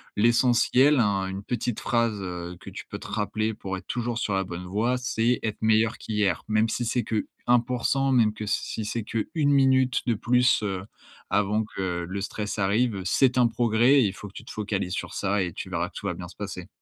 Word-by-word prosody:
L'essentiel, 125 +5 +4
hein, 100 -3 +2
une 95 +1 -5
petite 120 -1 -2
phrase, 115 -3 0
heu, 90 -1 -5
que - - -10
tu - - -8
peux - - -7
te - - -9
rappeler 110 +1 -1
pour 95 -1 -5
être 95 - -12
toujours 120 -1 -2
sur 105 - -1
la 95 - +1
bonne 90 0 -7
voie, 110 +7 0
c'est: 125 -1 +1
«Être 110 -1 -3
meilleur 110 0 +3
qu'hier» 105 -5 -1
même 110 +1 +2
si 120 - -2
c'est 120 +1 0
que 110 -2 -1 0.2
1%, 125 +3 +2
même 110 -4 +4
que 110 0 -6
si 110 +1 -2
c'est 115 +1 -3
que 110 +1 -3
1 150 -3 +2
minute 130 -2 +3
de 120 - +2
plus, 125 +2 +3
heu, 95 -2 -3 0.5
avant 105 +2 +2
que 90 -4 -3
le 100 +1 -4
stress 105 +1 -4
arrive, 105 +1 +1
c'est 130 +5 +3
un 120 - +5
progrès 115 +2 +3
et 115 - +4
il 95 - -1
faut 105 - -9
que 100 - -15
tu - - -10
te - - -9
focalises 100 -4 -2
sur - - -4
ça 100 0 0
et 90 -2 -1
tu 95 - -6
verras 85 0 -1
que - - -29
tout - - -7
va 95 - 0
bien 90 +1 -7
se 85 - -14
passer. 95 -3 -6
110 Hz, 225 wpm, -26 LUFS, 95-120 Hz, 0.5 s, un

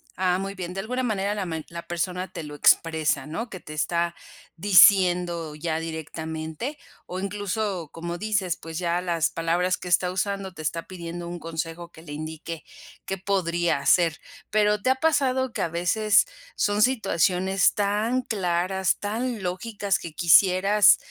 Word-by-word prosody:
Ah, 185 0 +1
muy 195 +1 -4
bien, 180 -1 -5
de 195 - -5
alguna 250 +5 -2
manera 205 -3 -1
la 200 -2 -2
men 160 -2 -4
la 170 0 -7
persona 180 +2 -2
te 170 - -6
lo 150 0 -8
expresa, 155 -2 +3
¿no?, 225 +10 -4
que 185 - -8
te 155 - -10
está 170 +2 0 0.4
diciendo 175 -3 +5
ya 160 +1 -2
directamente, 160 - -5 0.3
o 180 +1 -5
incluso, 200 -3 -3
como 170 +1 -5
dices, 205 -4 0
pues, 165 +1 -7
ya 175 0 0
las 170 -3 0
palabras 175 +2 0
que 180 - -9
está 180 0 +2
usando 195 0 -2
te 160 - -9
está 165 +2 -3
pidiendo 170 -1 -7
un 175 0 -5
consejo 165 +1 -5
que 160 - -14
le 145 -3 -9
indique, 160 +1 -6 0.4
qué 195 - -3
podría 175 -5 0
hacer, 170 0 +3 0.3
pero, 210 -1 +2
¿te 255 - +1
ha 260 - +4
pasado 260 -5 +1
que - - -3
a - - +1
veces 200 +5 +3 0.3
son 205 0 +1
situaciones 195 -5 +2
tan 210 +5 +1
claras, 190 -2 0
tan 225 +1 -3
lógicas 200 +2 -1
que 165 -3 -8
quisieras, 185 +5 +5
180 Hz, 160 wpm, -25 LUFS, 165-205 Hz, 0.4 s, diciendo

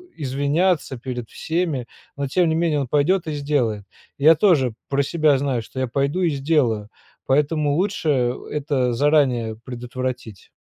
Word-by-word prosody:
извиняться 145 +2 0
перед 120 -2 -6
всеми, 160 -7 -2 0.3
но 140 0 -2
тем 170 +4 +2
не 160 - +1
менее 160 -3 +1
он 135 - -2
пойдет 160 +6 +1
и 155 - -2
сделает. 135 -8 -1 0.3
Я 155 +3 +6
тоже 145 - +3 0.2
про 140 0 +1
себя 155 -2 +2
знаю, 130 -4 -1
что 130 - -8
я 130 - 0
пойду 140 +8 -1
и 175 - +3
сделаю, 135 -7 0 0.4
поэтому 145 +1 +1
лучше 150 -9 +1 0.2
это 140 -5 0
заранее 130 -5 +2
предотвратить. 125 -3 -6
140 Hz, 145 wpm, -22 LUFS, 125-155 Hz, 0.4 s, Я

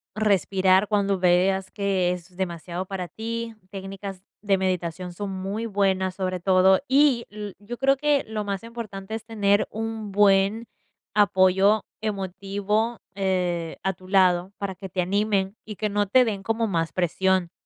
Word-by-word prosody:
respirar 195 -2 +3
cuando 200 -2 +1
veas 185 +2 +2
que 195 -3 0
es 180 0 -10
demasiado 175 0 -4
para 190 -2 -4
ti. 230 +1 -4 0.2
Técnicas 195 -1 -7 0.2
de 200 -2 +2
meditación 180 -1 -2
son 200 +2 -5
muy 195 +4 -3
buenas, 190 -2 +1
sobre 185 -1 -2
todo. 190 +2 +4
Y 265 -3 +4
l 210 -2 -7
yo 235 +4 -7
creo 270 +2 +3
que 290 0 +2
lo 215 -1 -3
más 200 -1 -3
importante 220 -4 -7
es 220 0 -4
tener 205 -3 +1
un 220 -1 -5
buen 200 +3 +3 0.5
apoyo 200 0 +4 0.2
emotivo, 205 +3 -2 0.2
eh, 180 -4 -1
a 190 - +1
tu 185 +1 -16
lado, 185 -1 +3
para 200 -1 -3
que 190 +1 -9
te 185 0 -1
animen 200 +1 0
y 215 - -8
que 215 +1 -2
no 205 0 0
te 255 +5 +5
den 205 -4 -2
como 225 +3 0
más 165 -4 -1
presión. 185 0 +1
195 Hz, 155 wpm, -25 LUFS, 185-215 Hz, 0.5 s, te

